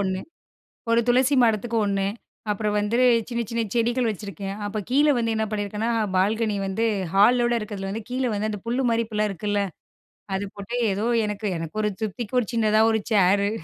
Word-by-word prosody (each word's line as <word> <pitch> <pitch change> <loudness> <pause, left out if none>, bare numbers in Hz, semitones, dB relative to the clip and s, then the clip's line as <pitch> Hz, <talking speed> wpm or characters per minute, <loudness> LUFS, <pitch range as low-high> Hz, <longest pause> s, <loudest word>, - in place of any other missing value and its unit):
ஒண்ணு. 190 -1 -1 0.7
ஒரு 230 - +4
துளசி 255 +3 +4
மடத்துக்கு 230 +1 +1
ஒண்ணு, 195 -1 0 0.5
அப்பறம் 210 0 -1
வந்துரு 230 +5 +1 0.3
சின்ன 235 -1 -1
சின்ன 230 0 0
செடிகள் 240 +1 +1
வெச்சுருக்கேன். 200 -1 -5
அப்ப 210 +1 -3
கீழே 290 +3 +4
வந்து 230 -1 0
என்ன 220 0 0
பண்ணியிருக்கேன்னா, 210 +2 -2 0.3
பால்கனி 215 +3 +1
வந்து 195 +4 -1 0.3
ஹாலோடு 240 +4 +4
இருக்கிறதுல 200 -3 -5
வந்து, 220 +2 -5
கீழே 255 0 -1
வந்து 210 +1 -1
அந்த 210 - -5
புல் 240 +3 0
மாரி 230 0 +2
இப்ப 220 - -9
எல்லா 215 0 +2
இருக்குல்ல, 205 +2 -1 0.7
அதை 195 +1 -2
போட்டே. 205 +5 -4 0.2
ஏதோ, 205 +3 -2 0.2
எனக்கு, 210 0 -3
எனக்கு 165 +6 -5
ஒரு 210 - +1
திருப்திக்கு 220 +3 -3
ஒரு 220 - -5
சின்னதா 215 -1 +3
ஒரு 220 -1 +1
ச்சேரு. 200 0 +4
215 Hz, 175 wpm, -24 LUFS, 205-235 Hz, 0.7 s, ஒரு